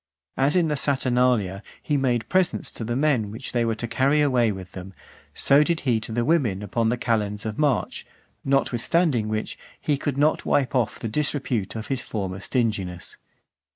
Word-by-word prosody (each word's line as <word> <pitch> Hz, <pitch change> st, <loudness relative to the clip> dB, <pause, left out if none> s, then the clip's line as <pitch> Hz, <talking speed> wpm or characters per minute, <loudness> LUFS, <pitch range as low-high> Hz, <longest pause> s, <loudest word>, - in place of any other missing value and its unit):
As 140 Hz, +4 st, +2 dB
in 175 Hz, -3 st, +3 dB
the 150 Hz, -, 0 dB
Saturnalia 125 Hz, -8 st, +1 dB, 0.2 s
he 150 Hz, -, -1 dB
made 125 Hz, -4 st, +1 dB
presents 185 Hz, -1 st, +1 dB
to -, -, -6 dB
the 120 Hz, +2 st, -2 dB
men 135 Hz, -7 st, +1 dB
which 110 Hz, +5 st, -7 dB
they 120 Hz, -1 st, +1 dB
were 115 Hz, -1 st, 0 dB
to 120 Hz, -, -4 dB
carry 135 Hz, +6 st, +2 dB
away 125 Hz, -6 st, +3 dB
with 95 Hz, -2 st, -8 dB
them, 95 Hz, 0 st, -9 dB, 0.4 s
so 140 Hz, +2 st, +4 dB
did 170 Hz, +1 st, 0 dB
he 120 Hz, -5 st, +1 dB
to 110 Hz, -, -7 dB
the 120 Hz, +1 st, 0 dB
women 125 Hz, -, +1 dB
upon 110 Hz, +3 st, 0 dB
the 125 Hz, -, 0 dB
calends 105 Hz, -3 st, -1 dB
of 110 Hz, +3 st, -4 dB
March; 145 Hz, -7 st, 0 dB, 0.4 s
notwithstanding 135 Hz, -1 st, +1 dB
which, 110 Hz, 0 st, -3 dB, 0.2 s
he 145 Hz, -2 st, 0 dB
could 140 Hz, -2 st, -2 dB
not 150 Hz, +2 st, +2 dB
wipe 135 Hz, -3 st, +1 dB
off 125 Hz, -5 st, 0 dB
the 115 Hz, -, -4 dB
disrepute 130 Hz, -5 st, -1 dB
of 110 Hz, -1 st, -6 dB
his 135 Hz, -2 st, 0 dB
former 95 Hz, -3 st, -4 dB
stinginess. 100 Hz, -6 st, -2 dB
120 Hz, 185 wpm, -24 LUFS, 110-140 Hz, 0.4 s, so